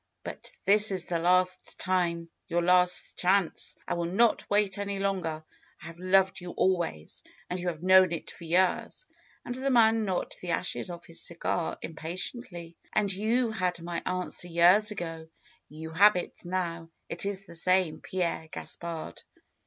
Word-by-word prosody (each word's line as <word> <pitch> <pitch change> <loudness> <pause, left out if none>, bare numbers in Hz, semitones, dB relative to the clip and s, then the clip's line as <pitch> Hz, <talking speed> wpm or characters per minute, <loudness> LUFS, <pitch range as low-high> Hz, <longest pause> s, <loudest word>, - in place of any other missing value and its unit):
"But - - -6
this 210 +1 +7
is 185 -3 0
the 170 -1 -2
last 185 +2 +1
time; 175 -3 0 0.2
your 175 -1 0
last 180 0 +3
chance. 185 -1 +1
I - - -1
will 170 -1 -2
not 225 +4 +2
wait 205 -1 +1
any 200 0 -3
longer. 185 -5 -2 0.4
I - - -13
have 165 +1 -10
loved 190 +1 +2
you 175 -1 -7
always, 170 - -1 0.3
and 180 - -2
you 180 - -4
have 165 -1 -4
known 185 -1 +6
it 170 - -4
for - - -13
years," 185 - +1 0.4
and 245 - -4
the 260 +2 -1
man 225 -3 +4
knocked 190 -3 -2
the 180 - -6
ashes 180 +2 -1
off 175 -1 -8
his 165 - -4
cigar 170 0 -2
impatiently. 170 +2 -5 0.2
"And 205 -2 +1
you 225 +4 +1
had 180 -4 -1
my 170 0 -4
answer 180 -1 -2
years 175 +5 +5
ago. 165 -5 -5 0.4
You 160 +2 -8
have 200 +5 +6
it 180 - -5
now. 170 -2 -3 0.2
It 175 +3 -3
is 195 -1 -3
the 170 - -12
same, 180 -1 +2
Pierre 170 -3 -2
Gaspard." 165 - -6
180 Hz, 165 wpm, -28 LUFS, 170-195 Hz, 0.4 s, this